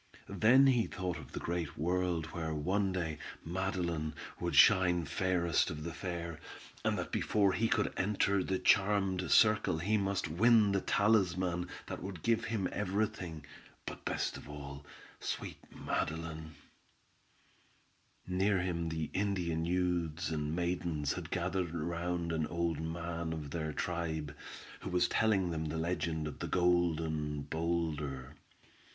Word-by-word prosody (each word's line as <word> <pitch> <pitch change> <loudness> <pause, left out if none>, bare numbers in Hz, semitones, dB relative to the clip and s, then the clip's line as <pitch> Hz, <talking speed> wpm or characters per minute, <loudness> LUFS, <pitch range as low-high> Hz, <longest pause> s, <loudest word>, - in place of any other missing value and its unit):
Then 130 +5 +5
he 125 -4 +4
thought 95 -4 -3
of - - -11
the - - -3
great 85 -2 -3
world 90 0 0
where 80 -2 -3
one 95 +6 +1
day 80 -5 -2 0.3
Madeline 85 -3 -2 0.2
would - - -1
shine 90 -2 +6
fairest 90 +1 +1
of 75 -3 -5
the 85 0 -4
fair, 85 -4 -4 0.4
and - - +1
that - - -4
before 100 -3 +2
he 115 - +2
could 110 -2 +1
enter 100 0 +1
the 95 - 0
charmed 95 -2 +2
circle 105 -6 +5
he 105 +6 +1
must 100 -2 0
win 105 +5 +5
the 100 -1 +1
talisman 90 -4 +2 0.2
that - - -6
would 95 -4 -6
give 115 -1 +2
him 110 -5 -1
every 105 +1 +1
thing, 85 -8 -7 0.4
but - - -7
best - - -1
of - - -11
all, 70 -1 -8 0.4
sweet - - -4
Madeline. 80 -1 -3 1.7
Near 95 +2 +2
him 85 -2 -1
the 80 -2 -3
Indian 90 -5 0
youths 85 -2 0
and 75 0 -1
maidens 85 -4 -1
had - - -6
gathered 90 -3 -1
round 85 +1 -2
an 80 -1 0
old 85 -2 -1
man 85 0 -3
of 75 -3 -6
their 80 -1 -2
tribe, 80 -3 -3 0.4
who - - -6
was 90 0 +3
telling 100 -5 +2
them 80 -1 -2
the 80 +1 -3
legend 80 -2 -1
of 75 - -7
the - - -3
"Golden 80 -4 +1
Boulder." 75 -4 -2
85 Hz, 145 wpm, -33 LUFS, 80-95 Hz, 1.7 s, shine